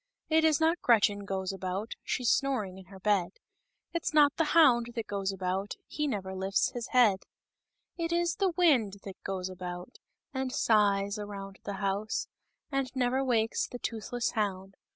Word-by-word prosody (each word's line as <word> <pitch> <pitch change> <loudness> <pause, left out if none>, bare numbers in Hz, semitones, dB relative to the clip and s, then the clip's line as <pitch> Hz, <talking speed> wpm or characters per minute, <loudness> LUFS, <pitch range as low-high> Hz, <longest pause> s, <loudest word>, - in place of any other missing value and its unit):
R 315 - +5
It 320 - +4
is 315 -2 +4
not 325 +2 +2
Gret 230 -4 +5
chert 205 -1 +1
goes 190 -1 -2
about, 190 +3 -4
She's 245 -2 +1
snoring 215 -9 0
inner 190 +1 -13
^e^/; 195 -3 +1 0.6
It's 335 -2 -2
not 290 -1 +6
the 325 - +2
Hound 245 -7 +6
t\i2X 235 -2 -5
goes 200 -1 -2
about 190 +1 -2
A - - -37
He 300 0 -2
never 195 -7 -3
lift 190 +1 -2
s - - +3
hisHeac/; 235 -4 +3 0.8
Itis 340 0 +1
the 385 -2 +2
^/«£/ 255 - +2
that 195 -2 -10
goes 190 -2 -3
about, 180 +2 -7 0.3
And 265 -1 -2
sighs 205 -3 +2
around 195 -1 -7
the 205 - -3
House, 200 +2 -2 0.4
And 275 -2 0
never 260 +1 +1
wakes 225 -4 +1
the 245 - -7
toothless 235 +1 -3
//own* 195 -3 -2
210 Hz, 170 wpm, -30 LUFS, 195-260 Hz, 0.8 s, not